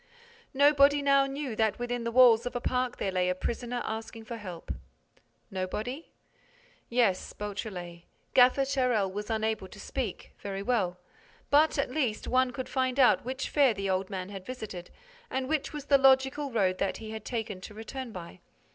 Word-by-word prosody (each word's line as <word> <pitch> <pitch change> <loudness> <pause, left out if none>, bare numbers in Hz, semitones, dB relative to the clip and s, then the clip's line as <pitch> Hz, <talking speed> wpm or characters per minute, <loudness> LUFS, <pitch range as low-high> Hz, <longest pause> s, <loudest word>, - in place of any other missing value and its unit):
Nobody 285 0 +5
now 275 -1 +4
knew 275 -3 -4
that 220 -1 +1
within 245 -1 -3
the 235 - -1
walls 245 -1 +6
of 245 - -6
a - - 0
park 250 0 -1
there 195 - -1
lay 180 -1 +1
a 180 - 0
prisoner 240 +5 -3
asking 220 0 -6
for 235 +1 -6
help. 185 -6 -7 0.8
Nobody? 215 - -4 0.8
Yes, 235 -6 +1
Beautrelet. 190 -5 -6 0.3
Gaffer 255 +2 +6
Charel 250 -8 +1
was 210 +1 -5
unable 220 -3 -1
to 195 - -13
speak. 235 -3 -5
Very 195 -1 -5
well. 200 -7 0 0.5
But, 305 +2 +5
at 280 -3 0
least, 255 -7 -1
one 255 0 +3
could 255 +1 -5
find 260 0 0
out 255 - +5
which 265 +1 -3
fair 275 -6 +4
the 195 -1 -1
old 185 0 -1
man 185 -1 -5
had 195 -2 -7
visited 210 -7 -7 0.4
and 260 0 -2
which 305 -1 -1
was 295 -2 -6
the 280 -1 +5
logical 270 +1 +4
road 190 -5 +1
that 195 - 0
he 220 -1 -8
had 220 -1 -6
taken 220 -6 -4
to 210 - -10
return 235 +3 -6
by. 170 - -9
235 Hz, 175 wpm, -29 LUFS, 200-265 Hz, 0.8 s, walls